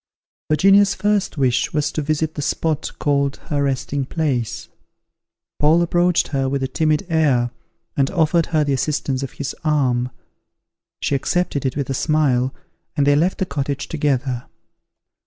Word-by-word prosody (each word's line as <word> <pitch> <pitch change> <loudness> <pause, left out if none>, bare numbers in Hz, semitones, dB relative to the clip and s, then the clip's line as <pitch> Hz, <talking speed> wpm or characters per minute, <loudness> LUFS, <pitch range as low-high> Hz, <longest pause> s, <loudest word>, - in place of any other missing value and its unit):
Virginia's 195 +6 +5
first 205 -4 0
wish 130 -3 +1
was 150 -1 0
to 155 - -2
visit 155 +1 -1
the 145 - -4
spot 155 +1 -1
called 140 -1 +1
her 145 -2 0
Resting 140 0 -1
place. 135 -5 -2 0.9
Paul 160 +4 +4
approached 175 0 +2
her 135 -2 0
with 135 0 -1
a - - 0
timid 155 +5 0
air, 140 -8 +2 0.4
and 135 -1 +2
offered 170 -2 +2
her 155 -2 +2
the 145 -1 0
assistance 135 -1 -1
of 135 - -5
his 140 - -5
arm; 130 -5 +1 0.9
she - - 0
accepted 140 0 0
it 130 - -3
with 140 -3 -1
a 135 - -2
smile, 135 -3 +1 0.5
and 140 - +3
they 145 0 +5
left 170 +6 +1
the 190 - 0
cottage 140 -2 -3
together. 135 -5 -1
145 Hz, 155 wpm, -20 LUFS, 135-160 Hz, 0.9 s, Virginia's